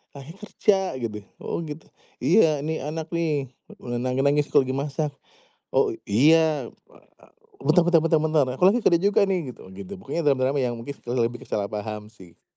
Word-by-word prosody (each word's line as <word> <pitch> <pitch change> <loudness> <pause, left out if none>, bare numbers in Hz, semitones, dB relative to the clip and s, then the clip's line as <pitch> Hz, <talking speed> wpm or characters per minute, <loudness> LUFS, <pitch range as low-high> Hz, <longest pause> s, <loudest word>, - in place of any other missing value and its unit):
Ayah 140 +3 -10
kerja," 210 -1 +1 0.2
gitu. 105 -2 -4 0.2
"Oh, - - -3
gitu," 150 +1 -9 0.4
"Iya, 160 -6 +4
nih 160 0 -2
anak 160 +1 -5
nih, 155 -6 -1 0.2
e 120 0 -6
nangis-nangis 140 +3 +1
aku - - +5
lagi 130 - -3
masak." 145 +2 -2 0.6
"Oh, - - +2 0.2
iya, 150 +3 +4 0.2
wa - - -19 0.2
a - - -20 0.3
bentar 155 +5 +4
bentar 170 -2 +4
bentar 165 -1 +3
bentar, 155 -3 +2
aku - - -2
lagi 240 +4 +2
kerja 170 - +5
juga 200 +1 +3
nih," 165 -10 -2
gitu 95 - -15
gitu. 100 -1 -8
Pokoknya 165 +5 -3
drama-drama 135 0 +2
yang 125 -2 0
mungkin 140 +4 -7
ke 120 - -12
lebih 120 -1 -1
ke - - -22
salah 100 -1 -1
paham 105 0 -5
sih. 95 -6 -19
145 Hz, 185 wpm, -24 LUFS, 120-160 Hz, 0.6 s, aku